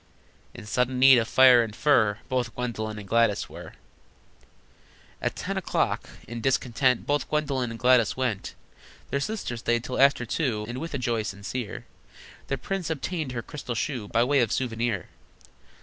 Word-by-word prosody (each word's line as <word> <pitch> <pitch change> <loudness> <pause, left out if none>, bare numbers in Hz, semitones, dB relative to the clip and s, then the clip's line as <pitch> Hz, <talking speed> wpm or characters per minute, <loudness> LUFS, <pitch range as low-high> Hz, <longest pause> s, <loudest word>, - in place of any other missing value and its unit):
In - - -9
sudden 125 +4 0
need 130 -1 +7
of 115 - -1
fire 130 -1 +7
and 110 -2 -4
fur 115 -9 +3
Both 125 -2 -2
Gwendolyn 110 -3 -3
and 105 -2 -8
Gladys 115 -1 +2
were. - - -10 1.5
At - - -1
ten - - -4
o'clock, - - -1 0.2
in 115 0 -6
discontent, 125 0 +1
Both 145 0 0
Gwendolyn 140 -5 0
and 115 - -6
Gladys 125 -2 +3
went. 125 -7 -2 0.6
Their 140 - +1
sister 145 - -3
stayed 120 0 0
till 125 +1 -2
after 140 -3 +4
two, 115 -4 -1
And, 120 +2 -5
with 165 0 -5
a - - 0
joy 120 -3 -1
sincere, 105 +3 -5 0.6
The 135 - -1
prince 195 +1 -3
obtained 160 -2 -3
her 115 -2 -4
crystal 130 -3 -6
shoe 120 -3 -3
By 115 +3 +2
way 140 +3 +2
of 115 -4 +2
souvenir. 115 -6 -2
125 Hz, 165 wpm, -26 LUFS, 115-135 Hz, 1.5 s, need